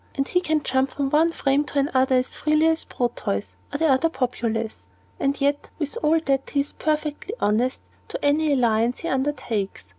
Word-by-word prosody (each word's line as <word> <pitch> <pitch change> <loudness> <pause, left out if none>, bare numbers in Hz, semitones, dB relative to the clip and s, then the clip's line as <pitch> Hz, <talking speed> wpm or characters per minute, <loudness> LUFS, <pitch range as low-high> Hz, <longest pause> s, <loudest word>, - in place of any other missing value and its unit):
And 275 0 0
he 360 - +1
can 310 -3 0
jump 265 +1 +1
from 275 0 -2
one 320 +3 +4
frame 280 -2 +1
to 290 - -6
another 265 -2 +2
as 255 0 0
freely 305 +1 +2
as 320 0 +1
Proteus 100 - -2 0.2
or - - -2 0.2
the 330 - +2
populace. 230 - -2 0.3
And 275 +1 0
yet, 285 +1 0
with 290 -4 -3
all 315 +2 +3
that, 270 -1 0
he 285 - +1
is 285 - -5
perfectly 305 +6 -2
honest 235 +5 +1 0.3
to - - -5
any 300 +1 +3
allegiance 235 -2 +2
he 335 - -4
undertakes. 260 -8 -2
275 Hz, 180 wpm, -24 LUFS, 250-300 Hz, 0.3 s, one